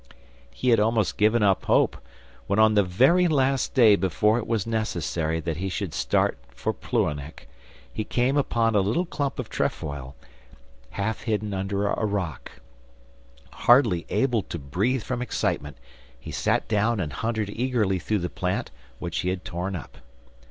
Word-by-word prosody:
He 60 - -2
had 115 -2 +5
almost 110 -1 +1
give 105 +2 +4
up 100 -4 +2
hope, - - +3 0.5
when 100 - 0
on 110 0 +5
the 105 - +5
very 130 - +4
last 135 -4 +1
day 115 -5 +7
before 105 +4 +2
it 115 - -6
was 110 -4 0
necessary 85 -7 -1
that 80 -1 -3
he 95 +2 -2
should 95 -3 -4
start - - +1 0.3
of - - -1
Plouhinec, 75 +1 -2 0.5
he 110 - -2
came 125 +5 0
upon 115 -5 +1
a 105 - +4
little 110 - +1
clump 145 -5 -3
of 125 - -4
trefoil, 70 -8 -3 0.7
half 105 +3 -3
hidden 105 -2 -1
under 100 +1 -1
a 100 - -1
rock. 100 -7 -3 1.0
Hardly 120 -9 +4
able 125 -5 +1
to 85 - -6
breathe 100 - -1
from 125 -1 -3
excitement, 75 - -2 0.4
he - - -9
sat - - 0
down 110 +1 +1
and 75 -5 -3
hunted 110 -3 -2
eagerly 115 -6 0
through 105 +6 -1
the - - 0
plant 90 +1 -3 0.3
which 85 +3 -4
he 90 - -1
had 95 0 -4
torn 90 +2 -3
up. 80 - -9
105 Hz, 160 wpm, -25 LUFS, 90-115 Hz, 1.0 s, day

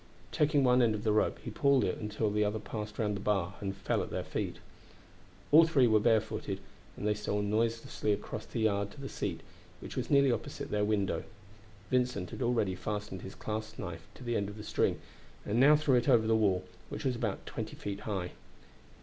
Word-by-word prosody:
Taking 145 -2 +3
one 125 0 +5
end 115 -3 +3
of 105 - -5
the 110 - +2
rope, 105 0 +2
he 115 - -5
pulled 140 +3 +3
it - - -1
until 105 0 -1
the 105 +1 +2
other 105 +1 0
passed 105 0 -6
round 105 -2 0
the - - -4
bar 100 -3 0
and 95 -1 -3
fell - - 0
at - - -4
their - - -3
feet. - - -3 1.0
All 160 +2 +8
three 140 -6 +4
were 110 -2 +5
barefooted, 110 0 +1 0.4
and - - -5
they 105 - +3
stole 105 0 -2
noiselessly 110 +1 0
across 105 +1 -3
the 115 - -3
yard 100 -2 +1
to - - -13
the 135 - -5
seat, - - -3 0.4
which - - -8
was - - -2
nearly 140 -2 +5
opposite 115 - -4
their 105 0 +1
window. 105 -2 0 0.7
Vincent 125 -8 0
had - - -7
already 120 -6 +1
fastened 105 0 -4
his 95 - -8
clasp 110 0 -5
knife 85 -3 -6
to - - -11
the 120 -1 -1
end 100 -2 0
of 105 - -9
the 105 - -7
string, - - +1 0.5
and 105 - -3
he - - +4
now 145 +3 +8
threw 150 -2 +2
it 125 +2 +3
over 115 -4 +5
the 110 0 +3
wall, 95 -4 +2 0.3
which - - -6
was 130 -2 +1
about 115 -4 -3
twenty - - -5
feet 100 -1 -5
high. 95 -4 -3
110 Hz, 215 wpm, -31 LUFS, 105-120 Hz, 1.0 s, All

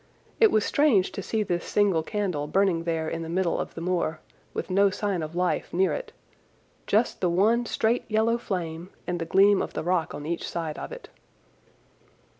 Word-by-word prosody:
It 445 - +7
was 215 - +2
strange 255 -11 +3
to - - -5
see 215 +3 -1
this 175 -3 -2
single 200 -6 +2
candle 180 -6 -2
burning 175 0 +1
there 165 -2 -1
in 165 +1 -3
the 165 - -5
middle 175 0 0
of - - -5
the 165 - -6
moor, 170 -3 -1 0.3
with - - -4
no 200 +2 +4
sign 195 -2 -2
of 155 +1 -6
life 180 0 0
near 190 +2 +2
it—just 450 - -4
the 180 - +2
one 220 +7 +2
straight 230 +2 0
yellow 225 +2 +2
flame 170 -4 -4 0.2
and 175 -1 -2
the 165 - -2
gleam 200 +2 +5
of - - -4
the - - -3
rock 175 -1 0
on 145 - -7
each 170 +2 -3
side 160 -3 -4
of - - -6
it. - - -9
185 Hz, 190 wpm, -26 LUFS, 165-210 Hz, 0.3 s, It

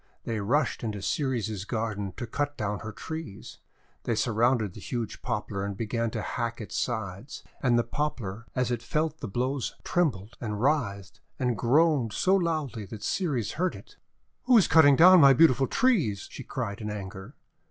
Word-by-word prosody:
They 115 -2 -3
rushed 125 +8 0
into 105 -3 -3
Ceres's 110 -4 -2
garden 105 -3 -3
to 120 - -4
cut 145 +5 -3
down 105 -1 -2
her 110 - -6
trees. 160 -3 -8 0.5
They 115 - 0
surrounded 115 -2 +1
the - - -10
huge 120 -3 -5
Poplar 100 0 -3
and 100 -1 -4
began 115 +1 -1
to - - -4
hack 115 -1 -3
its 105 -5 -7
sides. 110 +5 -4 0.2
And 125 -2 +3
the 120 - +3
Poplar 115 -5 -4
as 125 -1 0
it 120 -2 -1
felt 155 +5 -1
the 120 - -5
blows 125 +5 -2
trembled 120 - -1
and 105 -3 -3
writhed 105 - -1 0.2
and 125 -2 0
groaned 135 -1 +2
so 190 - +3
loudly 155 - -1
that 105 +1 -9
Ceres 145 - -1
heard 180 +2 -1
it. - - -14 0.5
'Who 250 -2 +6
is 205 - +5
cutting 145 -4 +7
down 180 +3 +8
my 140 -1 +8
beautiful 135 -2 +4
trees?' 160 - +1
she 135 - -8
cried 115 -5 -4
in 105 - -4
anger. 100 +3 -7
120 Hz, 175 wpm, -27 LUFS, 105-145 Hz, 0.5 s, down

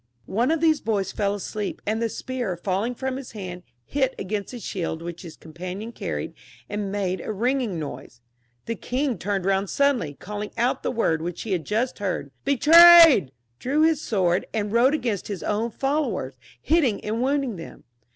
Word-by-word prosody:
One 230 - 0
of 325 0 +1
these 315 -3 +3
boys 205 -4 -1
fell 200 -1 -1
asleep, 205 0 -4
and 220 +2 -1
the 230 - 0
spear 245 -5 -4
falling 200 +7 -1
from 265 +1 -3
his 270 -2 -9
hand, 180 -4 -7 0.2
hit 265 -2 0
against 200 +1 -3
the 245 - -7
shield 170 -6 -4
which 170 0 -6
his 170 -4 -10
companion 180 +7 -7
carried, - - -4 0.3
and 205 -1 -3
made 190 -3 -2
a - - -4
ringing 235 -2 0
noise. 145 -5 -7 0.5
The 230 - -2
king 250 -2 -2
turned 195 0 -2
round 195 0 +1
suddenly, 265 - +1
calling 210 +4 -6
out 240 +2 +1
the - - -1
word 165 -9 0
which 175 +1 -4
he 225 - -5
had 175 -4 -1
just 230 +5 -1
heard 185 -8 -3
— - - -43
" - - -44
Betrayed 325 - +8
!" 120 - -48
— 120 - -46
drew 290 +4 +1
his 320 -2 +3
sword, 185 - 0
and 210 -2 -1
rode 250 +6 +4
against 235 - -2
his 200 -4 -5
own 215 +3 -1
followers, 270 - -1 0.3
hitting 280 - +1
and 220 +2 -1
wounding 270 -5 0
them. 165 - -10
215 Hz, 190 wpm, -24 LUFS, 185-260 Hz, 0.5 s, Betrayed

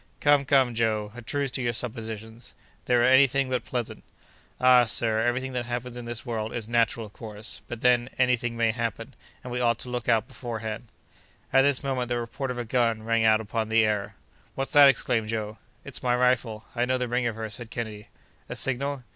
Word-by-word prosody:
"Come, 145 -1 +4
come, 135 -3 +3
Joe! 110 -2 0
a 120 - -9
truce 140 +3 -2
to 130 - -3
your 120 -1 0
suppositions; 110 -1 -5 0.3
they're 120 -1 +3
any 130 +2 +7
thing 135 0 -1
but 125 - 0
pleasant." 120 -3 -4 0.6
"Ah! 125 -1 +6
sir, 110 -1 +1
every 120 +2 +1
thing 130 0 -6
that 120 -1 -3
happens 120 0 -4
in 120 -1 -7
this 120 +1 -4
world 110 -3 -3
is 115 -3 -3
natural, 115 -1 +1
of 105 - -14
course; 110 -1 -8
but, 120 -1 -7
then, 125 0 +3
any 125 -1 +4
thing 120 -1 -4
may 115 -1 +3
happen, 115 -1 -4 0.3
and 125 - -6
we 125 - -1
ought 120 -2 +2
to 125 - -7
look 125 -1 -3
out 110 -2 +3
beforehand." 115 -1 -6 0.7
At 135 - +7
this 140 -1 +2
moment 130 -3 -2
the 120 - 0
report 120 +3 -4
of 125 - -3
a 120 - -3
gun 115 -2 +1
rang 115 0 +1
out 110 0 +5
upon 110 +1 -3
the 115 0 +4
air. 105 -2 -1 0.4
"What's 135 0 -3
that?" 145 -1 +8
exclaimed 115 -5 0
Joe. 110 -1 -4 0.3
"It's - - -5
my 125 -1 +2
rifle, 125 -3 +1
I 120 0 +1
know 130 +1 +1
the 125 -1 -2
ring 120 0 0
of 115 - -3
her!" 110 0 -4
said 120 0 -9
Kennedy. 110 -3 -6 0.4
"A - - -4
signal!" 135 +1 -2
120 Hz, 215 wpm, -26 LUFS, 110-125 Hz, 0.7 s, that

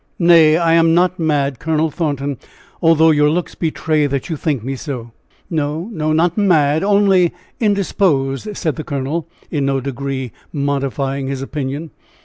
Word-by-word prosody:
Nay, 165 -3 +6
I 165 -1 +2
am 165 0 +4
not 180 +1 +2
mad, 145 -5 0
Colonel 160 0 0
Thornton, 145 -4 -2 0.4
although 160 -1 +5
your 150 -1 +3
looks 170 +2 -2
betray 155 -2 0
that 140 +1 -3
you - - -1
think 145 -5 -2
me 135 +2 -3
so." 125 -4 -6 0.4
"No, 155 +3 -2
no, 155 -6 -1
not 170 +5 +2
mad, 160 -5 +3
only 195 -3 +3 0.3
indisposed," 195 - 0
said 160 -3 -2
the 155 - -4
colonel, 145 +4 -3 0.2
in 145 -4 0
no 135 0 +1
degree 135 -1 -4 0.2
modifying 140 -1 -2
his 135 0 -3
opinion. 145 +3 -4
155 Hz, 150 wpm, -18 LUFS, 140-165 Hz, 0.4 s, Nay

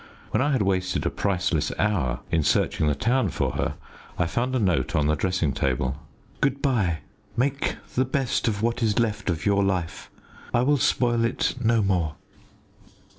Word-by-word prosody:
When 110 - +2
I 145 +3 +2
had 130 -6 +2
wasted 95 -1 0
a - - +1
priceless 90 -6 0
hour 95 - 0
in 85 -1 +3
searching 75 +1 +1
the 75 - +2
town 125 - +1
for - - -1
her, - - -2 0.4
I 85 - +2
found 120 +9 -1
a - - +2
note 90 - +1
on 75 -2 +2
the 75 - +3
dressing 85 -3 0
table 65 +1 0 0.5
"Good 135 0 +1
bye! 105 - +1 0.4
Make 135 +3 0 0.2
the 130 - +2
best 130 -1 0
of 105 -1 -1
what 115 +1 0
is 110 -3 +1
left 105 -4 0
of 85 -1 -2
your 100 -1 +3
life. 90 -4 -2 0.5
I 120 - +4
will 145 +2 +3
spoil 120 -2 +2
it 115 +1 0
no 115 -1 +3
more." 90 -6 0
100 Hz, 180 wpm, -25 LUFS, 85-120 Hz, 0.5 s, I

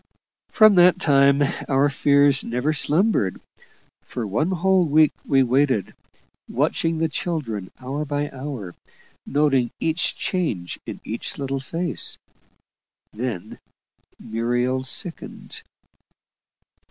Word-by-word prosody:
From 215 -2 +6
that 180 +1 +6
time 140 -3 +4 0.3
our 135 +1 +3
fears 140 -1 +3
never 125 +6 -1
slumbered. 155 - +1 0.6
For 120 -3 -5
one 115 - 0
whole 190 0 +2
week 155 -1 +4 0.2
we 135 -1 +4
waited, 130 -4 +1 0.6
watching 165 0 0
the 165 +1 +1
children 135 - -4
hour 135 +4 -4
by 145 0 -3
hour, 130 -9 -6 0.5
noting 135 -4 +2
each 165 +1 0
change 145 - -2
in - - -6
each 115 - -5
little 135 -1 -3
face; 165 +5 -2 1.0
then 115 -5 -5 0.6
Muriel 120 +3 -1
sickened. 165 +5 -4
140 Hz, 105 wpm, -23 LUFS, 125-160 Hz, 1.0 s, From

